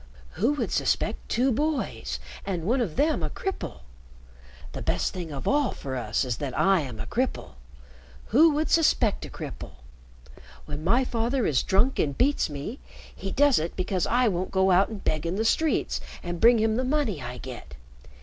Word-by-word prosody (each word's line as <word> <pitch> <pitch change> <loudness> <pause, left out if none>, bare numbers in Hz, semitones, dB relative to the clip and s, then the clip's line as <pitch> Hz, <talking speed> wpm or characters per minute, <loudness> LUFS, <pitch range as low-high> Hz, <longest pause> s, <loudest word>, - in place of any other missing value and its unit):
Who 235 - +1
would 295 - -2
suspect - - 0
two 255 +3 +2
boys 295 +4 -2 0.2
and 185 -4 -3
one 245 +8 +1
of 185 -10 -2
them 310 +2 +2
a - - -1
cripple? 385 -1 -5 0.9
The - - -6
best - - -1
thing 175 -4 -5
of 140 -2 -5
all 290 -2 +2
for 135 -1 -6
us 115 +1 -1
is 125 -3 -2
that 140 -4 -4
I 195 -1 +4
am 125 -6 -7
a 110 - -4
cripple. 255 - -2 0.8
Who 310 +9 +6
would 310 +1 0
suspect 255 -9 +3
a - - -9
cripple? - - -8 0.9
When 150 0 -6
my 240 +9 +3
father 240 +1 0
is 135 -5 +2
drunk 205 +7 +2
and 140 -2 0
beats 280 - +2
me, 150 - -6 0.4
he 195 - -5
does 285 +4 +4
it 165 +2 -4
because 185 -1 -1
I 245 +1 +3
won't 185 -2 -1
go 190 0 +2
out 185 +2 +4
and 215 -3 -7
beg 155 +1 -1
in 170 - -1
the 220 +3 -1
streets 315 +7 +1 0.2
and 175 -1 -5
bring 235 +1 +7
him 220 0 +1
the 255 - 0
money 255 - 0
I 125 0 -6
get. 125 - -9
200 Hz, 190 wpm, -26 LUFS, 155-260 Hz, 0.9 s, bring